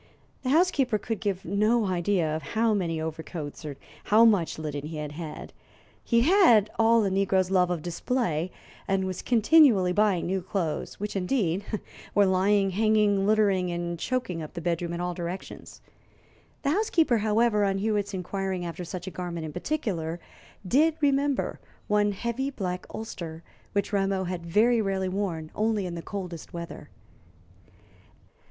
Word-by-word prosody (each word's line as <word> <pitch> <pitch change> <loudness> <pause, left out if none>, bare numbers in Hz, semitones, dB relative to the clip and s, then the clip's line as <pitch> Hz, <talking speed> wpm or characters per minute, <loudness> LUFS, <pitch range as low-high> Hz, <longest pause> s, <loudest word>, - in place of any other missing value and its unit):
The 255 - -2
housekeeper 280 -7 +3
could 220 0 -4
give 195 -3 -2
no 215 +5 +2
idea 175 -3 0
of 160 - -3 0.2
how 225 0 +3
many 170 -5 -1
overcoats 160 -1 -6
or 145 -3 -6 0.3
how 220 +2 +6
much 200 -8 +3
linen 150 -2 -4
he 160 0 -6
had 150 -1 -4
had. 155 0 -7 0.5
He 235 -1 +3
had 250 - +5
all 225 -1 +5
a 195 - 0
negro's 190 -1 +1
love 180 -2 +3
of 175 -4 -2
display, 175 -2 -1 0.4
and 195 -1 +1
was 185 -1 -4
continually 230 - +5
buying 205 -3 +2
new 190 +1 -1
clothes, 180 -4 -3
which, 210 +1 -4
indeed, 190 -2 0 0.5
were 205 - +6
lying, 195 +1 +3
hanging, 210 -1 +2
littering, 200 -4 +3
and 170 0 -3
choking 245 -9 -2
up 155 +3 -8
the - - -3
bedroom 170 0 -2
in 170 - -3
all 180 0 -2
directions. 175 +2 -7 0.8
The 280 - +2
housekeeper, 325 - +2
however, 215 0 +2
on 195 -1 +1
Hewitt's 205 -1 -1
inquiring 190 0 -3
after 170 +1 -5
such 175 +1 -6
a 190 - -5
garment 170 -2 -5
in 155 - -7
particular, 180 - -2 0.5
did 305 - +3
remember 280 -1 +1 0.3
one 210 0 +2
heavy 235 +6 -2
black 185 -9 -4
ulster, 170 -7 -7 0.3
which 200 +1 -1
Rameau 195 -1 +1
had 175 -2 -5
very 225 +6 +3
rarely 190 -2 -1
worn 180 -5 -3
only 215 -2 0
in 175 - -4
the 170 - -5
coldest 180 -4 -7
weather. 170 0 -7
195 Hz, 155 wpm, -27 LUFS, 175-220 Hz, 0.8 s, how